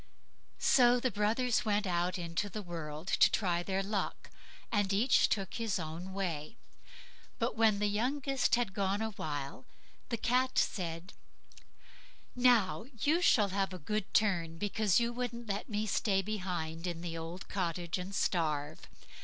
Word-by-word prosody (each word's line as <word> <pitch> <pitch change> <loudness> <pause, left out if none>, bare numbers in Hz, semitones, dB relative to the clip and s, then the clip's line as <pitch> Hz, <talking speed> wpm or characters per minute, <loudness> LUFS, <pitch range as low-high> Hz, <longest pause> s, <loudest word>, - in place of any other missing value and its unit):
So 245 -1 +5
the 255 0 0
brothers 220 +4 +1
went 210 -2 +1
out 180 0 0
into 170 +3 -2
the 210 +1 -6
world 160 -3 -6
to - - +5
try 175 -4 0
their 190 +2 -1
luck, 200 0 -3 0.4
and 205 -2 +1
each 220 +6 +4
took 195 -3 -1
his 225 -4 -1
own 165 +2 -5
way; 185 0 -3 0.8
but - - -1
when 220 -2 +4
the 210 - 0
youngest 255 +4 +1
had 240 -5 -1
gorse 195 0 0
a 220 0 -2
while, 145 -8 -5 0.4
the 235 - -1
cat 255 +3 +1
said: 170 -2 -1 1.2
"Now 245 -5 +3
you 315 - +2
shall 210 - +4
have 195 0 -1
a - - -5
good 210 +5 -3
turn, 170 -6 +1
because 205 +1 +2
you 235 0 0
wouldn't 240 -1 -4
let 200 +1 -3
me 210 0 -1
stay 195 -2 +1
behind 180 -5 -3
in 170 -1 -4
the 170 -1 -4
old 165 +3 -6
cottage 175 -2 -2
and 190 +2 -5
starve. 155 -6 0
195 Hz, 155 wpm, -32 LUFS, 175-220 Hz, 1.2 s, So